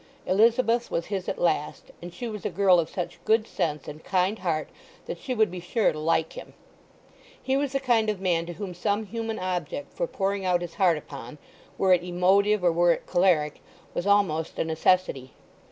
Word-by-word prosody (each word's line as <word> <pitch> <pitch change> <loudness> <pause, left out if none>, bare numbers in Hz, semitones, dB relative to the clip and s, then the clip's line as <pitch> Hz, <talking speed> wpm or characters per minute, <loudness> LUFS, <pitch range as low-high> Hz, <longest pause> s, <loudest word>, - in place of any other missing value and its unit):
Elizabeth 230 +4 +3
was 170 - -2
his 190 -2 -3
at - - -3
last 155 -3 -1
and 175 +1 -8
she 240 +7 -6
was 210 -3 -6
a - - -1
girl 185 0 +4
of 165 - -1
such 180 - -5
good 220 0 +3
sense 150 -9 -3
and 150 +1 -9
kind 190 +3 0
heart 165 -4 -1 0.4
that - - -6
she 255 - -3
would 220 -5 +2
be 180 - -6
sure 200 +6 +1
to 155 - -6
like 160 +1 0
him. - - -10 0.8
He 265 - -1
was 280 -1 -1
the 275 - +1
kind 235 -5 +2
of 210 -3 -2
man 170 -3 0
to 175 - -5
whom 190 0 -6
some 205 +4 -1
human 225 +1 -4
object 180 - -4
for - - -2
pouring 195 - -2
out 180 -1 +1
his 170 -1 -7
heart 175 -4 +3
upon—were 150 +7 -3
it 175 -1 +2
emotive 190 +3 +2
or 175 - +4
were 175 +1 +4
it - - -7
choleric—was 175 0 -1
almost 190 -6 +2
a - - +1
necessity. 160 -4 0
185 Hz, 195 wpm, -26 LUFS, 170-215 Hz, 0.8 s, girl